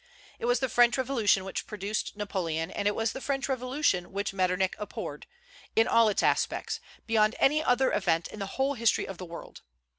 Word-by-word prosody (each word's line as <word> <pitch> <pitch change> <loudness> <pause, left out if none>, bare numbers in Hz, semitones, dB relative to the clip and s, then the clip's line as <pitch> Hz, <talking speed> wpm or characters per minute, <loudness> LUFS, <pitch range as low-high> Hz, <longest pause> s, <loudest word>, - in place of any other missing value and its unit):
It - - -3
was 245 +1 +2
the 265 - +2
French 240 +1 +4
Revolution 230 -8 +2
which 190 - -4
produced 210 0 -3
Napoleon, 175 -5 -2
and 205 - -1
it 205 - +1
was 225 0 0
the 265 - -7
French 275 0 -1
Revolution 255 - 0
which 200 0 -2
Metternich 185 0 +1
abhorred, 210 - -6 0.5
in 225 +1 +4
all 230 -2 +5
its 205 - 0
aspects, - - 0 0.3
beyond 220 0 +3
any 305 +3 +3
other 255 0 +3
event 165 -5 +1
in 215 - -10
the 195 - -3
whole 270 +1 +2
history 230 -3 +1
of 195 - -8
the 185 - -6
world. 170 0 -10
215 Hz, 190 wpm, -28 LUFS, 195-250 Hz, 0.5 s, all